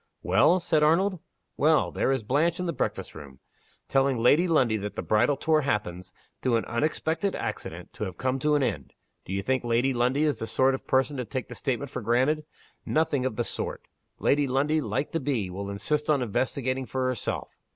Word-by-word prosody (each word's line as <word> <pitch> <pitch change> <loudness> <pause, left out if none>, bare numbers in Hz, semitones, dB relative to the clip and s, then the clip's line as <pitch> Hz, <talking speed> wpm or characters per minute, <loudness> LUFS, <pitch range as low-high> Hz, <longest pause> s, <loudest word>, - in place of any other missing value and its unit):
"Well?" 180 +3 +4
said 160 -3 +1
Arnold. 175 +5 +3 0.4
"Well 155 +1 +3
there - - 0
is 135 -4 0
Blanche 160 - +1
in 180 - -2
the 170 - -1
breakfast - - -3
room 70 -4 -11 0.5
telling 135 -1 +2
Lady 145 +10 +4
Lundie 130 -10 +3
that 105 0 -5
the - - -3
bridal 120 +6 +2
tour 155 -1 +2
happens, 95 -8 -2 0.3
through 125 -2 +2
an 115 - 0
unexpected 160 - -1
accident, - - -5
to 105 - -4
have 90 -3 -7
come 130 +1 -1
to 150 +2 +2
an 145 - +2
end. - - -3 0.3
Do - - -8
you 100 0 -1
think 130 +2 0
Lady 120 +3 +1
Lundie 125 +4 +1
is 150 -6 +1
the 110 - -4
sort 130 +3 +3
of 130 - -5
person 135 +2 +1
to 125 - -3
take 130 +3 -5
the - - -7
statement 135 0 -3
for 125 - -4
granted? 130 +7 +1 0.4
Nothing 145 -5 +1
of 130 - -5
the 120 - 0
sort! - - -4 0.3
Lady 145 0 +2
Lundie, 145 +4 +1
like 115 +4 -2
the 165 - -1
bee, 125 - -1
will 100 +2 -5
insist 150 +10 -1
on 145 -4 +3
investigating 130 +3 -1
for 130 -1 -2
herself. 125 -4 -3
130 Hz, 205 wpm, -27 LUFS, 115-150 Hz, 0.5 s, Well